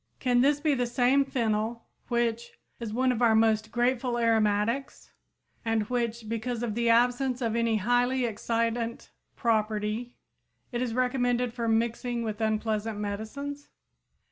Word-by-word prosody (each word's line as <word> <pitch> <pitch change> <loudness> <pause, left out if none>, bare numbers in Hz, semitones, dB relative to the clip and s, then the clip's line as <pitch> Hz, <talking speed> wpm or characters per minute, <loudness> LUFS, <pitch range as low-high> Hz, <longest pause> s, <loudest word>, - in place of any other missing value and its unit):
Can 245 -2 +3
this 285 +2 +3
be 300 0 +2
the 245 -2 0
same 250 +3 +3
fennel 230 -3 -1 0.2
which 235 -1 -1 0.2
"is 230 -3 -5
one 255 +3 +2
of 245 -1 -2
our 230 -2 +5
most 220 -1 +3
grateful 245 0 +1
aromatics," 225 +3 0 0.5
and 225 -2 +1
which, 235 -2 -2
because 230 +1 -3
of 230 -3 -2
"the 235 +1 +1
absence 245 +2 +3
of 230 -3 -1
any 230 -1 +2
highly 245 +4 +2
excitant 230 +1 -2 0.2
property," 220 +1 -1 0.6
is 240 -1 -2
recommended 245 -1 +1
for 235 -1 -3
mixing 235 +1 0
with 215 -1 -4
unpleasant 220 0 -1
medicines? 220 +8 -5
235 Hz, 135 wpm, -28 LUFS, 220-245 Hz, 0.6 s, our